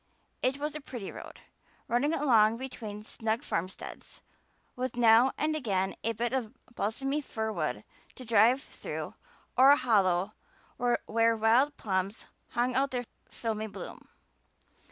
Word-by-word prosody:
It 260 +2 +1
was 295 +1 -3
a 305 - -6
pretty 240 -8 -7
road, - - -10 0.5
running 260 +6 +2
along 230 -8 +4
between 225 -5 -7
snug 225 +3 -2
farmsteads, 185 - -5 0.5
with 255 0 -3
now 240 +2 +6
and 310 +1 0
again 195 -9 0
a 230 - +1
bit 235 +3 -2
of 245 -5 -2 0.2
balsamy 270 +8 -1
fir 220 -5 -3
wood - - -2 0.3
to 255 - -10
drive 235 +4 +4
through - - -6 0.4
or 260 +2 +7
a 285 - +8
hollow 200 -6 +2 0.4
where 230 -1 +2
wild 240 +7 +3
plums 195 0 -2 0.3
hung 245 +1 +1
out 270 +2 +2
their 245 -2 -3 0.2
filmy 220 -2 -3
bloom. 200 -2 -9
235 Hz, 135 wpm, -30 LUFS, 215-265 Hz, 0.5 s, a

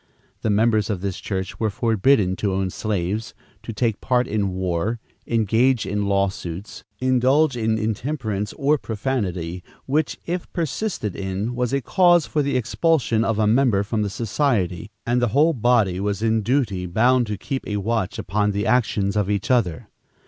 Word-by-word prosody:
The - - -1
members 110 +1 +2
of 100 -4 -2
this 95 -2 -3
church 95 -2 -4
were 110 - +1
forbidden 105 -1 +2
to 100 -2 -1
own 95 -1 -1
slaves, 105 +1 -3 0.3
to - - -6
take 115 -1 -1
part 125 -1 +1
in 105 -2 0
war, 95 +4 -2 0.3
engage 115 +2 +2
in 105 0 -1
lawsuits, 100 -1 -2 0.2
indulge 130 +3 +3
in 110 -2 0
intemperance 110 -1 -2
or 145 +1 +1
profanity, 95 -8 -3 0.2
which, 150 +3 0
if 175 +1 -4
persisted 165 - -2
in, 100 +4 -3
was 125 -1 -1
a 140 0 0
cause 175 -1 +4
for 150 - 0
the 140 -1 0
expulsion 125 -2 +1
of 115 -1 0
a 110 - +2
member 110 -2 +3
from 110 +1 -2
the 105 - -1
society, 110 - -1 0.2
and 120 +1 +1
the 120 - +3
whole 160 +3 +5
body 115 - +2
was 100 +2 -2
in 110 0 +2
duty 105 -6 0
bound 120 +6 +3
to 105 -1 -3
keep 135 +6 -4
a 105 - -2
watch 110 -1 -1
upon 105 0 0
the 100 +2 -1
actions 110 -4 +1
of 105 -2 0
each 100 +3 -1
other. 100 -10 +1
110 Hz, 170 wpm, -22 LUFS, 100-125 Hz, 0.3 s, whole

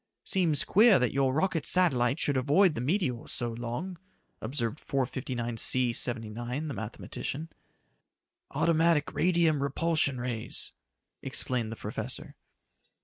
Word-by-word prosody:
"Seems 170 -6 +2
queer 215 +2 +6
that 125 -2 0
your 135 -1 +2
rocket 165 +2 0
satellite 135 -8 +3
should 145 - 0
avoid 150 +8 +4
the 120 - -4
meteors 130 - -1
so 120 -1 -1
long," 120 +10 -5 0.4
observed 120 +2 -2
459C 125 -2 0
79, 120 +5 -3
the - - -4
mathematician. 125 +7 -5 1.0
"Automatic 165 +1 +2
radium 165 -4 +2
repulsion 140 -1 +1
rays," 120 -3 -3 0.5
explained 120 -4 -2
the - - -5
professor. - - -6
135 Hz, 110 wpm, -29 LUFS, 120-165 Hz, 1.0 s, queer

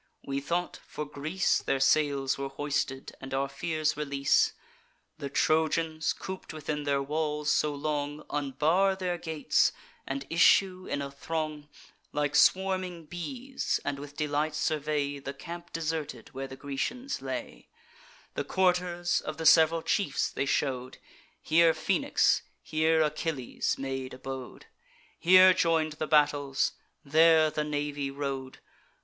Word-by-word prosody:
We 135 0 -2
thought, 175 +5 -2
for 150 - -5
Greece 150 +6 0
Their 135 - 0
sails 140 -1 +2
were 135 0 -4
hoisted, 140 -1 -3
and 135 0 -5
our 135 +1 0
fears 155 +2 -1
release. 140 -2 +2 0.7
The 140 - -4
Trojans, 160 +2 +1
coop'd 190 -3 -7
within 150 -1 -4
their 140 -1 +1
walls 150 +1 -1
so 150 -1 +1
long, 145 0 -3
Unbar 150 +7 +2
their 180 -2 -2
gates, 160 -4 +1 0.4
and 135 0 -3
issue 185 +2 +4
in 145 - -2
a 140 - -6
throng, 155 0 -4 0.4
Like 150 0 0
swarming 185 -1 +2
bees, 255 - -3
and 140 -1 -2
with 145 0 -10
delight 150 0 -1
survey 150 -2 -1
The 140 0 -7
camp 170 +4 -9
deserted, 155 -7 -4
where 135 +1 -6
the 135 - -9
Grecians 190 - -4
lay: - - -6 0.6
The - - -2
quarters 180 -1 +1
of 155 - -5
the 160 - -4
sev'ral 160 +1 +6
chiefs 195 -9 0
they 140 - -2
show'd; 130 -2 -1 0.5
Here 165 0 +4
Phoenix, 195 - +2 0.2
here 160 0 +2
Achilles, 150 -4 -2
made 135 -1 -4
abode; 130 -1 -8 0.5
Here 185 +1 +8
join'd 165 -3 +1
the 155 - -1
battles; 145 -2 +2 0.3
there 160 +1 +5
the 150 - -1
navy 145 -1 -2
rode. 135 -1 -4
150 Hz, 130 wpm, -29 LUFS, 140-165 Hz, 0.7 s, Here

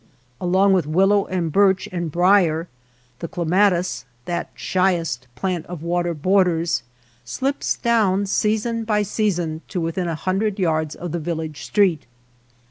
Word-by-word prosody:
Along 190 +2 +3
with 180 -6 +1
willow 195 +5 +3
and 175 -3 -2
birch 195 +1 +3
and 170 -3 -3
brier, 175 -1 +3 0.5
the 170 - -4
clematis, 180 -3 +1 0.2
that 175 - -3
shyest 170 -9 0
plant 185 -4 -2
of 170 -3 -7
water 175 0 -1
borders, 175 -2 +2 0.4
slips 265 - -2
down 210 -5 +2
season 220 +3 0
by 210 -1 +1
season 180 -6 -1
to 185 - -3
within 170 +2 -2
a 165 - -2
hundred 195 +5 -1
yards 160 -4 0
of 175 -2 -6
the 170 - -2
village 160 -2 -4
street. 185 - +2
180 Hz, 135 wpm, -21 LUFS, 165-195 Hz, 0.5 s, Along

